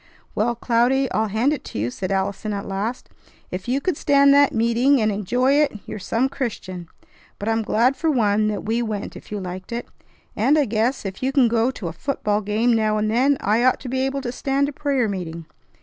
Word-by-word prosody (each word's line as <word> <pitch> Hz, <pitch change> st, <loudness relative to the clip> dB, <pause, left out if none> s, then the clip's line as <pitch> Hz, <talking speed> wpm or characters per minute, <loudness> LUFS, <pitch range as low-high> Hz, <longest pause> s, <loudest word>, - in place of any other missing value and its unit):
"Well, 235 Hz, +3 st, 0 dB
Cloudy, 245 Hz, +3 st, +1 dB
I'll 220 Hz, +1 st, +1 dB
hand 225 Hz, +8 st, +1 dB
it 295 Hz, -, -5 dB
to -, -, -7 dB
you," 115 Hz, +4 st, -1 dB
said 185 Hz, +7 st, -4 dB
Allison 200 Hz, +2 st, -1 dB
at 200 Hz, -1 st, -4 dB
last. 205 Hz, +6 st, -4 dB, 0.4 s
"If 185 Hz, +3 st, -5 dB
you 255 Hz, +3 st, +1 dB
could 365 Hz, +2 st, -1 dB
stand 280 Hz, 0 st, +4 dB
that 285 Hz, 0 st, +5 dB
meeting 235 Hz, +4 st, +3 dB
and 215 Hz, -1 st, +2 dB
enjoy 245 Hz, +7 st, +1 dB
it, 290 Hz, -6 st, +2 dB
you're -, -, -6 dB
some 230 Hz, +6 st, 0 dB
Christian! 205 Hz, -10 st, -5 dB, 0.5 s
But 205 Hz, -, -6 dB
I'm 225 Hz, 0 st, +1 dB
glad 235 Hz, +5 st, +2 dB
for 325 Hz, -, 0 dB
one 215 Hz, -6 st, +2 dB
that 210 Hz, -1 st, -3 dB
we 225 Hz, +2 st, 0 dB
went 215 Hz, -3 st, -4 dB
if -, -, -12 dB
you 210 Hz, -, -3 dB
liked 185 Hz, +1 st, -7 dB
it; 235 Hz, +1 st, -4 dB, 0.5 s
and 265 Hz, +8 st, +3 dB
I 295 Hz, -, +3 dB
guess, 230 Hz, +2 st, -1 dB
if 190 Hz, -1 st, -6 dB
you 260 Hz, +1 st, 0 dB
can 265 Hz, -3 st, +4 dB
go 230 Hz, 0 st, +2 dB, 0.2 s
a 165 Hz, -2 st, -3 dB
football 210 Hz, -, -1 dB
game 215 Hz, +4 st, +1 dB
now 215 Hz, -1 st, +1 dB
and 215 Hz, 0 st, 0 dB
then, 265 Hz, +5 st, +3 dB
I 215 Hz, +4 st, +2 dB
ought 255 Hz, 0 st, +3 dB
to 255 Hz, -, -6 dB
be 260 Hz, +1 st, -1 dB
able 270 Hz, +1 st, -1 dB
to 245 Hz, -2 st, -4 dB
stand 275 Hz, +2 st, 0 dB
a -, -, -8 dB
prayer 275 Hz, -5 st, 0 dB
meeting. 170 Hz, -5 st, -5 dB
230 Hz, 220 wpm, -22 LUFS, 205-265 Hz, 0.5 s, that